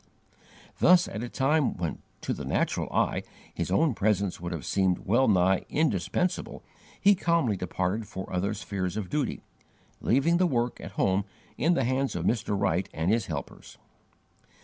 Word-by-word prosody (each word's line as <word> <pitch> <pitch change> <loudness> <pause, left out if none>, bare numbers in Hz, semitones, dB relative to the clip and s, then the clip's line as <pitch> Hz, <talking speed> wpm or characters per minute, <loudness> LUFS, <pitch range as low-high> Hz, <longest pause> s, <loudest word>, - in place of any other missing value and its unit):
Thus, 180 0 +6
at 105 - -5
a 120 - -4
time 140 +2 +1
when, 85 -3 -3 0.2
to - - -2
the - - -6
natural - - -1
eye, - - +1 0.3
his - - -3
own 160 -4 +3
presence 100 -4 0
would 85 0 -4
have 85 -5 -5
seemed 95 -2 +1
well 120 +7 +3
nigh 95 -2 +3
indispensable, 150 - -1 0.4
he 205 0 +6
calmly 170 - +1
departed 95 +4 -2
for 95 +1 -7
other 100 +4 0
spheres 100 -2 -3
of 100 -4 -4
duty, 145 -4 -1 0.6
leaving 140 +8 +2
the 180 0 +3
work 120 -5 -1
at - - -8
home 95 +1 +1 0.3
in 170 +5 +2
the 135 - +1
hands 130 +2 0
of - - -2
Mr. 105 -3 0
Wright 95 -1 0
and 80 +5 +1
his 115 -2 +1
helpers. 70 -5 -7
105 Hz, 165 wpm, -28 LUFS, 95-135 Hz, 0.6 s, Thus